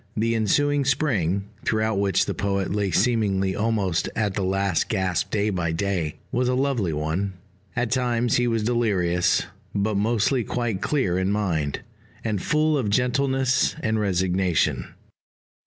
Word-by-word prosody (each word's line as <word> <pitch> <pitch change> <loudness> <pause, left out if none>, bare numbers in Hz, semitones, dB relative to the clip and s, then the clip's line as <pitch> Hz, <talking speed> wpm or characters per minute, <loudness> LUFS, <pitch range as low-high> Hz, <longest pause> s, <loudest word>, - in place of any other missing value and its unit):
The 115 +2 +1
ensuing 145 +7 +2
Spring, 105 - +1 0.2
throughout 110 -2 0
which 100 -3 +2
the - - -2
poet 100 -1 -1
lay 100 -1 0
seemingly 95 -2 +1
almost 105 -6 0
at 105 -3 0
the 100 - -2
last 95 -1 0
gasp 95 -5 0
day 105 0 0
by 90 -4 -1
day, 85 -3 -1 0.2
was 125 0 +1
a 125 - +1
lovely 130 -9 0
one. 80 +6 -2 0.4
At 120 -2 -1
times 120 -2 +1
he 120 0 +2
was 115 -2 0
delirious; 100 -7 +1 0.3
but 100 +1 0
mostly 115 +4 +1
quite 115 -4 -2
clear 100 -12 0
in 95 +1 0
mind, 85 -9 -1 0.4
and 105 -4 -1
full 155 -1 +2
of 110 -6 -1
gentleness 130 +3 +1
and 110 0 0
resignation. 95 -3 +1
105 Hz, 145 wpm, -24 LUFS, 95-120 Hz, 0.4 s, ensuing